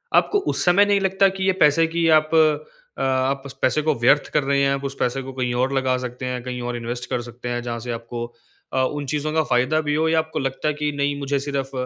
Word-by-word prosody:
आपको 410 Hz, -, +3 dB
उस -, -, +2 dB
समय 185 Hz, +3 st, +5 dB
नहीं 205 Hz, -1 st, +2 dB
लगता 195 Hz, 0 st, +3 dB
कि 190 Hz, -, -2 dB
ये -, -, +5 dB
पैसे 150 Hz, +2 st, +4 dB
की 170 Hz, -1 st, +2 dB
आप 155 Hz, +1 st, -4 dB
अ, 160 Hz, -, 0 dB
आप 135 Hz, +1 st, 0 dB
उस 140 Hz, -, -7 dB
पैसे 140 Hz, +4 st, +2 dB
को 155 Hz, 0 st, +1 dB
व्यर्थ 140 Hz, +5 st, +4 dB
कर 150 Hz, -, +2 dB
रहे 140 Hz, 0 st, +1 dB
हैं, 135 Hz, 0 st, +3 dB
आप 140 Hz, 0 st, -4 dB
उस 140 Hz, 0 st, -4 dB
पैसे 125 Hz, +2 st, 0 dB
को 135 Hz, +1 st, -8 dB
कहीं 125 Hz, -2 st, -2 dB
और 135 Hz, +1 st, -1 dB
लगा 130 Hz, -1 st, +1 dB
सकते 125 Hz, +1 st, -6 dB
हैं, 125 Hz, -1 st, -3 dB
कहीं 125 Hz, 0 st, -5 dB
और -, -, -5 dB
इन्वेस्ट 120 Hz, +1 st, -5 dB
कर 120 Hz, -, -1 dB
सकते 120 Hz, 0 st, -8 dB
हैं, 120 Hz, 0 st, -2 dB
जहाँ 120 Hz, -1 st, -4 dB
से -, -, -2 dB
आपको 115 Hz, 0 st, -5 dB, 0.5 s
अ, 130 Hz, -, +2 dB
उन 145 Hz, +2 st, -2 dB
चीज़ों 150 Hz, +1 st, -1 dB
का 160 Hz, -, +3 dB
फ़ायदा 130 Hz, +4 st, +1 dB
भी 150 Hz, -1 st, -2 dB
हो 160 Hz, +1 st, +1 dB
या 160 Hz, 0 st, +3 dB
आपको 160 Hz, 0 st, -3 dB
लगता 135 Hz, +2 st, -2 dB
है 150 Hz, -, +1 dB
कि, 150 Hz, 0 st, -2 dB
"नहीं, 145 Hz, 0 st, -1 dB
मुझे 140 Hz, 0 st, -1 dB
सिर्फ़ 140 Hz, -1 st, -3 dB
140 Hz, 265 wpm, -22 LUFS, 125-155 Hz, 0.5 s, समय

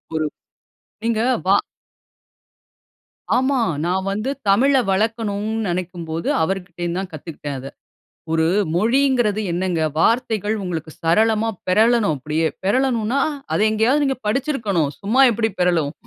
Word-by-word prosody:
1 155 Hz, -1 st, 0 dB, 0.8 s
நீங்க 225 Hz, -1 st, +1 dB, 0.3 s
வா. 195 Hz, -, +6 dB, 1.8 s
ஆமா. 260 Hz, +1 st, +2 dB, 0.3 s
நான் 190 Hz, +2 st, -1 dB
வந்து 215 Hz, +6 st, -2 dB, 0.2 s
தமிழ 250 Hz, +8 st, +4 dB, 0.2 s
வளர்க்கணுன்னு 220 Hz, 0 st, -1 dB
நினைக்கும்போது, 170 Hz, -2 st, -4 dB
அவருகிட்டருந்து 175 Hz, -1 st, -3 dB
தான் 190 Hz, -1 st, -6 dB
கத்துக்கிட்டேன் 145 Hz, -3 st, -6 dB
அத. 135 Hz, +1 st, -7 dB, 0.6 s
1 160 Hz, 0 st, +2 dB, 0.3 s
மொழிங்கிறது 235 Hz, 0 st, +2 dB
என்னங்க? 175 Hz, -1 st, -1 dB, 0.2 s
வார்த்தைகள் 220 Hz, 0 st, +1 dB
உங்களுக்கு 165 Hz, -4 st, -4 dB
சரளமா 220 Hz, +6 st, +2 dB, 0.2 s
பெரளணும் 220 Hz, -2 st, +3 dB
அப்பிடியே. 155 Hz, +4 st, -1 dB, 0.2 s
பெரளணுன்னா, 245 Hz, +3 st, +1 dB, 0.3 s
அத -, -, +1 dB
எங்கேயாவது 240 Hz, +7 st, +2 dB
நீங்க 270 Hz, -2 st, -1 dB
படிச்சிருக்கணும். 215 Hz, -, 0 dB
சும்மா 235 Hz, +7 st, +3 dB
எப்பிடி 220 Hz, 0 st, 0 dB
பெரளும்? 165 Hz, -5 st, +2 dB
205 Hz, 110 wpm, -21 LUFS, 175-230 Hz, 1.8 s, வா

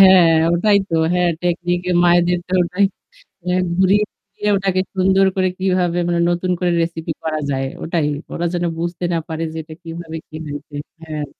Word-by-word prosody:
হ্যাঁ 185 Hz, -3 st, +8 dB, 0.2 s
ওটাই 200 Hz, +4 st, +4 dB
তো -, -, -2 dB, 0.2 s
হ্যাঁ 180 Hz, -1 st, +3 dB
টেকনিক 175 Hz, 0 st, 0 dB
এ -, -, +2 dB
মায়েদের 175 Hz, 0 st, +4 dB
তো -, -, -8 dB
ওটাই 180 Hz, +3 st, +1 dB, 0.6 s
এহ 180 Hz, -, +2 dB, 0.2 s
ঘুরিয়ে-ফিরিয়ে 205 Hz, +1 st, +1 dB
ওটাকে 190 Hz, -1 st, +1 dB
সুন্দর 190 Hz, +1 st, +4 dB
করে 185 Hz, -1 st, +2 dB
কিভাবে 180 Hz, -2 st, +1 dB
মানে 170 Hz, -1 st, +1 dB
নতুন 175 Hz, +1 st, -1 dB
করে 180 Hz, -1 st, +2 dB
রেসিপি 165 Hz, -1 st, -3 dB
করা 155 Hz, -1 st, -1 dB
যায় 135 Hz, -1 st, -1 dB, 0.2 s
ওটাই। 165 Hz, -2 st, 0 dB, 0.3 s
ওরা 175 Hz, -, -1 dB
যেন 175 Hz, -, 0 dB
বুঝতে 170 Hz, +1 st, -3 dB
না 170 Hz, -, +1 dB
পারে 160 Hz, 0 st, -4 dB
যে 160 Hz, -, -8 dB
এটা 155 Hz, 0 st, -11 dB
কিভাবে 165 Hz, -1 st, -7 dB
কি 155 Hz, -, -9 dB
হইছে। 145 Hz, 0 st, -8 dB, 0.3 s
হ্যাঁ। 155 Hz, -2 st, -4 dB
175 Hz, 175 wpm, -19 LUFS, 165-185 Hz, 0.6 s, হ্যাঁ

